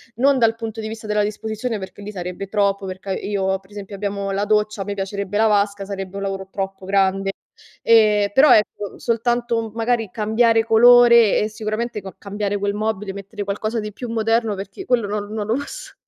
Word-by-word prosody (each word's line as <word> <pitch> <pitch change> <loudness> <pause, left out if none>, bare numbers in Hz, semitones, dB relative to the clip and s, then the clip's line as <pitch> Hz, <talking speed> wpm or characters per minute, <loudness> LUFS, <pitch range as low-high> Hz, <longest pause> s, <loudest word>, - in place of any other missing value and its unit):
non 270 +3 +3
dal 225 -1 +3
punto 225 -1 -6
di 220 - -4
vista 220 0 -7
della 210 0 +1
disposizione, 220 +2 -3
perché 190 +1 -9
lì 205 - -7
sarebbe 180 0 -6
troppo, 200 -1 0
perché 185 +1 -7
a - - +1
io 190 -2 -1
per 195 +1 -25
esempio 200 -1 -8
abbiamo 200 0 -3
la 200 +1 -1
doccia, 210 -1 +1
a - - -3
me 205 - -3
piacerebbe 200 0 -4
la 225 - +4
vasca, 200 -1 +1
sarebbe 195 -1 -6
un - - -4
lavoro 195 -1 -4
troppo 195 -1 -5
grande. 195 0 +1 0.5
Ehm, 210 -3 +4
però, 270 +2 +7
ecco, 210 -1 -1
soltanto, 235 0 0
mhmm, 220 - -7
magari 225 -2 0
cambiare 225 +2 +2
colore 235 -1 +6
e 215 - 0
sicuramente 215 +1 -4
ca 190 -2 -10
cambiare 205 0 -3
quel 200 0 -1
mobile, 210 -2 -2
mettere 200 +1 -7
qualcosa 215 +3 -2
di 210 0 -5
più 245 +4 -7
moderno, 225 0 +1
perché 200 - -8
quello 235 -5 +1
non 205 0 -3
non 215 -2 -3
lo 225 - +1
posso 285 +1 -7
210 Hz, 200 wpm, -21 LUFS, 200-225 Hz, 0.5 s, però